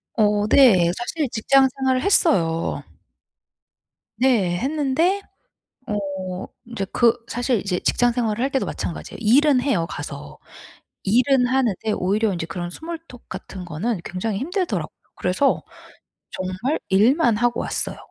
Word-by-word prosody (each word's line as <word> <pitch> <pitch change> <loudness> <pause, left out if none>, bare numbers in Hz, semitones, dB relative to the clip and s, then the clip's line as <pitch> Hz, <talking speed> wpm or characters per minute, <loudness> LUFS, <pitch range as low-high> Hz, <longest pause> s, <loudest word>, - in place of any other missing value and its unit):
어 210 -1 +2
네. 190 -11 +6
사실 280 +3 -2
직장 265 +4 +4
생활을 260 -1 +1
했어요. 165 - +2 1.4
네. 210 -10 +2
했는데 305 - 0 0.7
어 190 -3 -4 0.2
인제 230 -4 -4
그 235 -1 +4
사실 245 -2 0
이제 185 -2 -2
직장 245 0 +2
생활을 230 -1 -1
할 270 - +1
때도 270 -1 0
마찬가지예요. 165 - -5
일은 260 +4 +4
해요 235 -12 0
가서. - - -7 0.7
일은 250 +5 +3
하는데 240 -5 0
오히려 205 +3 +1
인제 170 -1 -4
그런 175 0 -5
스몰토크 325 - -9
같은 185 -2 -8
거는 175 +4 -3
굉장히 195 +3 -3
힘들더라고요. 360 +6 -2 0.2
그래서 185 +10 +1 0.7
정말 185 +11 -2
일만 230 - +4
하고 240 0 +1
왔어요. - - -3
235 Hz, 280 characters per minute, -22 LUFS, 190-270 Hz, 1.4 s, 네